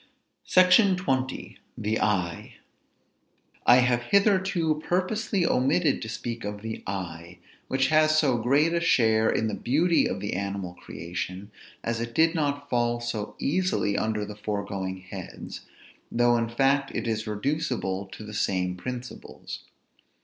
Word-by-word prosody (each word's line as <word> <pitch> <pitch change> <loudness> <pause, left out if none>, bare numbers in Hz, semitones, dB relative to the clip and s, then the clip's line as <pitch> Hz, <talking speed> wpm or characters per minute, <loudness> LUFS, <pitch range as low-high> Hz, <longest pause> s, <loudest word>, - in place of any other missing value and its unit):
SECTION 185 +2 +5
XX. 135 -7 -2 0.2
THE 110 +1 -1
EYE. 90 -5 -1 1.1
I 120 - +9
have 125 -1 +3
hitherto 190 - +2
purposely 190 +1 0
omitted 140 +3 +2
to 110 - -5
speak 115 +1 -5
of 105 0 -5
the 110 0 -5
eye, 90 -2 -5 0.3
which 130 0 +1
has 155 0 +4
so 135 -6 +3
great 140 +8 +3
a 170 - +2
share 110 -9 +3
in 110 - +1
the - - -3
beauty 165 +7 +2
of - - -3
the 105 - -3
animal 100 -1 -3
creation, 90 +4 -6 0.3
as 115 0 -2
it 115 0 -5
did 160 +1 +4
not 145 -3 -1
fall 120 -2 +1
so 120 -3 -4
easily 180 - 0
under 105 -1 -1
the 105 - -8
foregoing 100 -3 -4
heads, 95 - -9 0.4
though 120 0 +3
in 115 -1 0
fact 135 +3 +2
it - - -2
is 110 -1 -2
reducible 105 - -2
to 110 - -10
the 105 0 -9
same 90 -3 0
principles. 125 +6 -7
120 Hz, 140 wpm, -26 LUFS, 105-155 Hz, 1.1 s, I